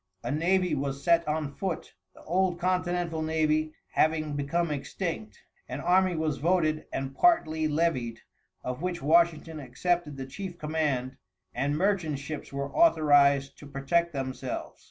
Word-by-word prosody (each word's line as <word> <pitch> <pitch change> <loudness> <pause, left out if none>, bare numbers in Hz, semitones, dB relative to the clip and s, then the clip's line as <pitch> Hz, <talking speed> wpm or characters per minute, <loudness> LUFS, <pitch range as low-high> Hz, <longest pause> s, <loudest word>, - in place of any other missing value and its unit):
A 120 - -2
navy 180 +3 +2
was 140 -1 -2
set 170 0 +3
on 150 -2 -1
foot, 190 0 -4 0.2
the - - -15
old 180 +1 +1
continental 175 -2 0
navy 155 -1 +1 0.2
having 155 -1 +1
become 155 +4 0
extinct. 145 - -4 0.3
An 125 - -4
army 185 +2 +3
was 155 -2 -1
voted 155 -2 +1
and 135 0 -3
partly 160 - +3
levied, 145 -8 0 0.4
of 125 +3 -4
which 180 -1 -2
Washington 165 0 +3
accepted 150 +3 -1
the 135 - -5
chief 180 +5 -7
command, 145 -5 -1 0.4
and 145 +2 0
merchant 180 -5 +1
ships 145 +2 -7
were 140 0 -4
authorized 145 - +4
to 145 - -11
protect 145 +5 0
themselves. 130 -2 -5
155 Hz, 140 wpm, -28 LUFS, 140-170 Hz, 0.4 s, authorized